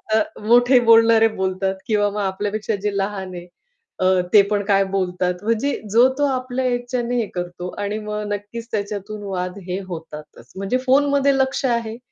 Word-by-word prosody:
अ, - - +5 0.2
मोठे 245 +3 +5
बोलणारे 225 -1 +6
बोलतात 190 -2 -2
किंवा 205 -2 +2
मग 210 - -4
आपल्यापेक्षा 205 +3 -2
जे 205 -1 -1
लहान 195 -1 -3
आहे 175 0 -9 0.5
अ, 185 - +1 0.3
ते 210 - +9
पण 205 -1 +1
काय 195 -1 +3
बोलतात, 180 -1 0
म्हणजे 230 +6 0 0.2
जो 240 +3 +6
तो 290 - +2
आपल्या 255 -1 -2
ह्याच्याने 245 0 -1
हे 230 - +1
करतो 175 0 -5
आणि 205 +1 -2
मग 210 0 -4
नक्कीच 210 +3 -6
त्याच्यातून 205 0 -4
वाद 185 -1 -4
हे 180 +2 -2
होतातच. 160 -3 -10
म्हणजे 195 +6 -1
फोनमध्ये 280 +1 +3
लक्ष 265 +1 0
आहे, 235 -2 -1
210 Hz, 165 wpm, -21 LUFS, 195-240 Hz, 0.5 s, ते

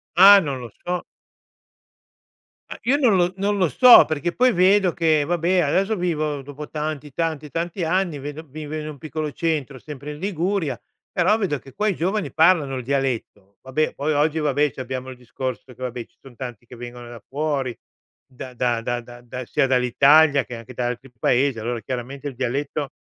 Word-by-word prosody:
Ah 200 +2 +9
non 140 -6 -3
lo 120 - -8 0.2
so. 180 0 -2 1.7
Ah - - -7
io 260 +5 +3
non 245 -9 +4
lo 175 0 +2
non 200 +1 0
lo 180 -4 +2
so 245 - +9
perché 155 +2 -2
poi 250 0 +4
vedo 185 0 +4
che, 160 -3 +2
vabbè, 175 +3 +1
adesso 195 +7 +1
vivo, 155 -5 -1
dopo 145 +2 -9
tanti, 150 -2 -4
tanti, 155 -2 -2
tanti 170 +2 -3
anni, 175 -3 0
vedo 145 +3 -7
vivo 155 +1 -7
in 155 0 -4
un 150 - -9
piccolo 155 +1 -4
centro, 150 -6 -2
sempre 150 +1 -8
in 150 - -9
Liguria, 180 - -1 0.3
però 185 +5 +2
vedo 175 - -1
che 135 - -15
qua 210 0 -1
i 195 - +1
giovani 190 +4 -2
parlano 160 -4 +4
il 125 - -4
dialetto. 120 -7 -3
Vabbè, 130 +4 -1
poi 145 +3 -2
oggi, 150 +2 +1
vabbè, 145 -1 +1
c’abbiamo 130 0 -5
il - - -9
discorso 125 +1 -5
che, 130 - -18
vabbè, 125 -1 -4
ci - - -38
son 135 -3 -15
tanti 120 -2 -8
che 125 - -12
vengono 120 0 -9
da 120 -3 -11
fuori, 140 -3 -2 0.6
da 130 0 -9
da 120 -2 0
da 120 +1 -2 0.2
da 125 +1 -7
sia 135 - +1
dall’Italia 140 +3 +4
che 120 0 -8
anche 120 +2 -11
da 120 0 -2
altri 125 +2 -5
Paesi, 125 0 +1
allora 120 +1 -3
chiaramente 130 +5 -6
il 135 - -6
dialetto 135 +3 -2
145 Hz, 190 wpm, -22 LUFS, 130-170 Hz, 1.7 s, Ah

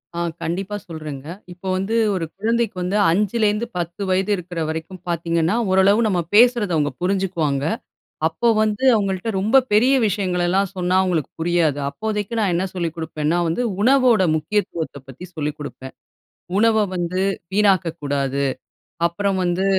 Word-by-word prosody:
ஆ 170 - -2 0.2
கண்டிப்பா 185 +5 -3
சொல்லுறேங்க. 155 -4 -7 0.3
இப்ப 175 - -26
வந்து 195 +4 -1 0.2
ஒரு 170 -3 -2
குழந்தைக்கு 230 0 0
வந்து 180 +3 0
5 205 +5 +1
லேந்து 210 +2 +1
10 175 +3 -4
வயது 190 +2 +1
இருக்குற 175 -1 -6
வரைக்கும் 160 +3 -6
பாத்தீங்கன்னா, 170 +3 0 0.2
ஓரளவு 190 +3 +4
நம்ப 180 -4 +1
பேசுவத 235 -4 +5
அவங்க 145 -1 +1
புரிஞ்சுக்குவாங்க. 175 -7 0 0.6
அப்ப 165 +9 0
வந்து 215 +3 0
அவங்கள்ட்ட 195 0 -1
ரொம்ப 220 +7 +4 0.2
பெரிய 245 +6 +5
விஷயங்கள் 185 -3 -1
எல்லாம் 190 +1 +1
சொன்னா 180 0 0
அவங்களுக்கு 170 -6 0
புரியாது. 165 -3 +1
அப்போதைக்கு 210 +7 -3
நான் 200 -4 +1
என்ன 180 +3 0
சொல்லிக் 170 -3 -3
குடுப்பேன்னா 160 0 -2
வந்து 165 +9 -1 0.2
உணவோட 250 -3 +4
முக்கியத்துவத்த 160 -2 -2
பத்தி 135 +7 -10
சொல்லிக் 150 -1 -3
குடுப்பேன். 130 -2 -8 0.6
"உணவ 220 0 +4
வந்து 180 +1 -2 0.3
வீணாக்கக்கூடாது. 160 -9 +1 0.6
அப்புறம் 195 +3 -1
வந்து 180 +2 0
185 Hz, 140 wpm, -21 LUFS, 165-205 Hz, 0.6 s, பேசுவத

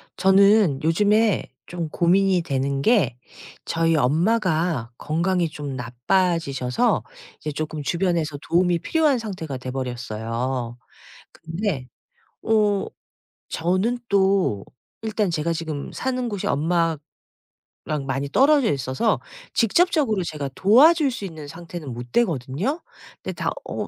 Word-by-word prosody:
저는 195 -5 +4
요즘에 205 +6 +3 0.2
좀 170 -2 -5
고민이 185 +3 +3
되는게 140 - +1 0.5
저희 165 0 +1
엄마가 165 - +1
건강이 170 +2 0
좀 145 -3 -6
나빠지셔서 135 - 0 0.4
이제 150 - -4
쪼끔 155 0 -4
주변에서 170 -3 0
도움이 175 0 +2
필요한 300 - +2
상태가 180 - -5
돼 130 0 -6
버렸어요. 120 -1 -3 0.6
근데 165 - -4 0.5
어 210 -3 +2 0.6
저는 185 +8 0
또 190 - +2 0.4
일단 215 -3 -1
제가 165 0 -1
지금 160 -3 -5
사는 255 -2 -2
곳이 205 -3 -4
엄마랑 165 +1 +1 1.1
많이 135 +1 -2
떨어져 275 - +4
있어서 135 - 0 0.3
직접적으로 260 - +2
제가 150 -4 -4
도와줄 285 - +5
수 220 -5 -5
있는 160 -5 -8
상태는 165 -2 -8
못 120 0 -8
되거든요. 175 - 0 0.4
근데 - - -4
다 - - -2 0.2
어 - - -3
170 Hz, 250 characters per minute, -23 LUFS, 140-205 Hz, 1.1 s, 도와줄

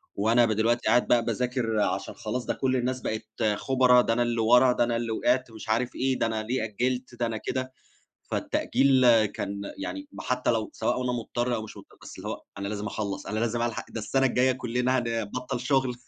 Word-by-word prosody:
وأنا 115 +3 +4
ب 110 - 0
دلوقتي 115 +3 +1
قاعد 125 - +4
بقى 120 -1 +3
باذاكر 120 -1 -1
عشان - - -1
خلاص، 120 +3 -4
ده - - 0
كل 130 -1 0
الناس 130 +1 -1
بقت 110 0 -3 0.3
خُبرا، 125 -2 +4
ده 115 - +1
أنا 120 - 0
اللي 120 -1 0
ورا، 125 +3 +6
ده - - +2
أنا 120 0 0
اللي 115 -1 -2
وقعت 125 +2 +1
مش 110 -1 -10
عارف 120 +3 0
إيه، 130 0 0
ده - - +2
أنا 110 -1 -2
ليه 120 +1 -1
أجِّلت؟ 125 +3 -2
ده 120 - -1
أنا 115 -1 -2
كده. 130 +3 -4 0.6
فالتأجيل 130 -3 +3
كان 100 0 -5 0.2
يعني 290 0 -5
م - - -9
حتّى 125 0 0
لو 110 -2 -1
سواء 125 - -1
وأنا 125 -1 -1
مضطر 120 +1 -2
أو 110 - -2
مش 110 - -10
مضطر، - - -14
بس - - -10
اللي - - -6
هو - - -5 0.2
أنا 100 0 -3
لازم 105 0 -4
أخلّص، 100 -2 -4
أنا 110 +2 -2
لازم 120 0 0
ألحق، 120 -1 -2
ده 115 - -5
السَنة 135 +5 +1
الجايّة 130 +1 +3
كُلّنا 125 +1 0
هنبطّل 115 +1 -3
شُغل. 130 -1 +1
120 Hz, 215 wpm, -27 LUFS, 110-125 Hz, 0.6 s, ورا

